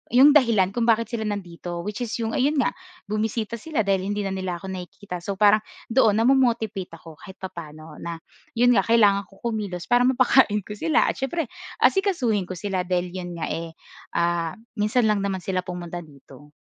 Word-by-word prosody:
'yong 275 +4 +8
dahilan 220 -8 +3
kung 235 +1 0
bakit 230 0 +3
sila 220 -2 -2
nandito 175 -4 -5
which 210 +1 -5
is 235 -2 -3
'yong 225 - -1
ayun 280 +4 +2
nga, - - +2 0.4
bumisita 220 +1 -2
sila 305 -2 -1
dahil 195 -1 +1
hindi 205 0 -1
na 195 - -2
nila 185 -2 -3
ako 190 - -7
nakikita. 180 0 -7
So, 195 +3 -4
parang 210 +1 +5 0.3
doon 225 -4 +4
namo-motivate 225 -6 +2
ako 160 -2 -14
kahit 190 -2 -11
papa'no 155 -4 -9
na, 170 0 -5 0.4
'yon 245 +1 +5
nga 195 -5 +3
kailangan 205 -4 +4
ko 195 - -22
kumilos 210 -7 -3
para 245 +1 +5
mapakain 255 -4 +4
ko 210 - -11
sila 160 -4 +3
at - - -3
siyempre 280 0 -2 0.3
asikasuhin 265 - +2
ko - - -5
sila 185 0 -2
dahil 180 -1 0
'yon 180 -1 -6
nga, 165 - -3
eh, 165 0 -4 0.4
ah, 170 -1 0 0.2
minsan 215 +2 +2
lang 200 -2 +1
naman 190 -2 -2
sila 185 0 -2
pumunta 175 -1 -6
dito. 145 0 -16
200 Hz, 185 wpm, -24 LUFS, 180-230 Hz, 0.4 s, yong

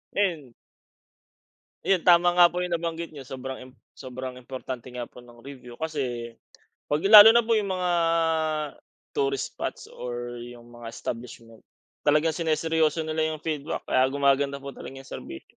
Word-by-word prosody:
Ayun. 165 -11 -1 1.3
Ayun, 195 -2 +3
tama 175 0 +6
nga 175 0 +7
po 180 +1 -3
yung 180 - -4
nabanggit 170 0 -3
niyo. 140 -4 -11
Sobrang 130 0 -6
im 130 0 -12 0.2
sobrang 130 -1 -8
importante 130 -1 -7
nga 125 -1 -6
po 125 - -12
ng 120 -1 -16
review. 125 -3 -11
Kasi 125 -6 -4 0.5
'pag 150 +1 -1
lalo 215 +1 +11
na 235 - +5
po 225 -1 +1
yung 200 -3 -1
mga 180 -1 -1 1.3
tourist 135 -1 -1
spots - - -5
or 120 0 -6
yung 120 0 -11
mga 115 -1 -9
establishment 115 -1 -8 0.4
talagang 155 +2 +3
siniseryoso 160 -1 +1
nila 160 0 -1
yung 155 - -10
feedback, 155 -1 -3
kaya 130 - +3
gumaganda 140 0 +1
po 140 - -6
talaga 135 0 -9
yung 135 - -17
serbi 65 - -8
140 Hz, 155 wpm, -26 LUFS, 125-165 Hz, 1.3 s, lalo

